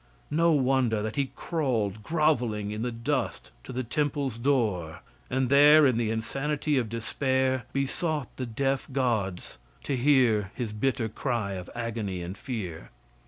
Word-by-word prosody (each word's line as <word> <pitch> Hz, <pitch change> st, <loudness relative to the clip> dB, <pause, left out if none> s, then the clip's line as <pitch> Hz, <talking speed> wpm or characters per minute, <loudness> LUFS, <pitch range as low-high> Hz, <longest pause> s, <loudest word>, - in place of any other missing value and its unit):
No 165 Hz, +3 st, +4 dB
wonder 130 Hz, -6 st, +2 dB
that 110 Hz, 0 st, -3 dB
he 140 Hz, -2 st, 0 dB
crawled 115 Hz, -, -1 dB
groveling 120 Hz, -9 st, +1 dB
in 105 Hz, +1 st, -4 dB
the 120 Hz, +1 st, -1 dB
dust 125 Hz, +3 st, -2 dB
to -, -, -8 dB
the 130 Hz, +1 st, -2 dB
temple's 140 Hz, -1 st, -1 dB
door, 105 Hz, -, 0 dB, 0.3 s
and 130 Hz, 0 st, +1 dB
there, 145 Hz, +3 st, +7 dB
in 130 Hz, -3 st, +4 dB
the 115 Hz, -2 st, 0 dB
insanity 140 Hz, +7 st, -1 dB
of 115 Hz, -3 st, -2 dB
despair, 130 Hz, +3 st, 0 dB
besought 140 Hz, +1 st, -2 dB
the 130 Hz, -, -3 dB
deaf 135 Hz, +4 st, -1 dB
gods 110 Hz, -, -1 dB, 0.2 s
to 135 Hz, -, -1 dB
hear 125 Hz, -6 st, +3 dB
his 115 Hz, -4 st, -3 dB
bitter 115 Hz, +1 st, 0 dB
cry 115 Hz, -3 st, -2 dB
of 90 Hz, -2 st, -6 dB
agony 110 Hz, -6 st, -3 dB
and 90 Hz, +2 st, -6 dB
fear. 105 Hz, -, -6 dB
125 Hz, 150 wpm, -28 LUFS, 110-140 Hz, 0.3 s, there